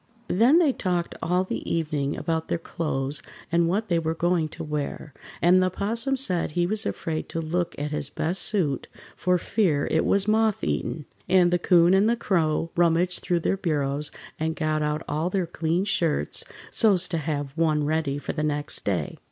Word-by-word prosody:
Then 235 - +5
they 320 -6 +4
talked 175 -5 -1
all 180 +3 +1
the 185 - -4
evening 150 -4 -1
about 160 -1 -2
their - - 0
clothes 145 -4 -3 0.3
and 170 0 +3
what 210 +5 0
they 170 -3 +2
were 160 0 -2
going 170 -2 +1
to - - -7
wear, 150 -1 -4 0.3
and 180 +2 +6
the 185 - +2
'Possum 230 +8 -1
said 180 - -1
he 175 - +3
was 210 +4 -1
afraid 160 -1 -3
to 165 - -3
look 170 +2 -2
at 150 +1 -3
his 150 -2 -2
best 175 +6 -2
suit 155 - 0 0.3
for 180 0 +2
fear 170 -6 +1
it 160 - +3
was 200 0 +2
moth 220 -1 +2
eaten, 150 - -2 0.2
and 180 -1 +5
the 175 - +3
'Coon 175 0 +5
and 200 +3 +4
the 235 - +3
Crow 165 -5 0
rummaged 175 +1 +3
through 175 -1 0
their 195 - 0
bureaus 145 -4 -1 0.3
and 160 +1 -1
got 155 -1 0
out 150 +1 -1
all 155 +4 -1
their 185 -1 0
clean 170 +2 -1
shirts 160 - 0 0.3
so's 190 -5 +4
to 165 - -2
have 145 -2 -3
one 155 -2 +2
ready 150 -2 0
for 145 - -4
the 155 - -2
next 150 -1 -2
day. - - -2
165 Hz, 190 wpm, -25 LUFS, 155-185 Hz, 0.3 s, and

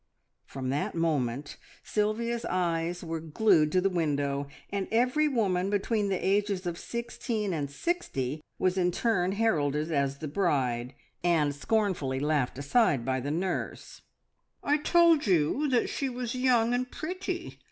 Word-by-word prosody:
From 130 -1 -5
that 140 +5 -1
moment 145 -5 -1 0.3
Sylvia's 230 +3 -1
eyes 175 -1 -1
were 165 -1 -3
glued 160 -1 +3
to 185 - +4
the 195 - +2
window, 145 -4 0 0.2
and 200 -1 -2
every 250 +7 +3
woman 195 -8 +1
between 205 +1 0
the 195 - +1
ages 200 -1 0
of 175 -1 -3
sixteen 235 -3 -3
and 145 -4 -2
sixty 150 - -2 0.2
was 185 0 +1
in 180 -1 +3
turn 185 -2 +1
heralded 155 -8 +1
as 140 -2 0
the 155 - -5
bride, 135 -7 0 0.3
and 160 -5 +2
scornfully 160 -5 0
laughed 145 -4 0
aside 140 - +2
by 130 0 0
the 135 +3 -4
nurse. 175 +4 -3 0.6
"I 290 +1 +3
told 330 -2 +4
you 185 - +2
that 250 -2 +2
she 275 - -2
was 245 -2 -4
young 245 -2 +3
and 250 0 -1
pretty!" 360 +3 -5
180 Hz, 145 wpm, -29 LUFS, 145-230 Hz, 0.6 s, to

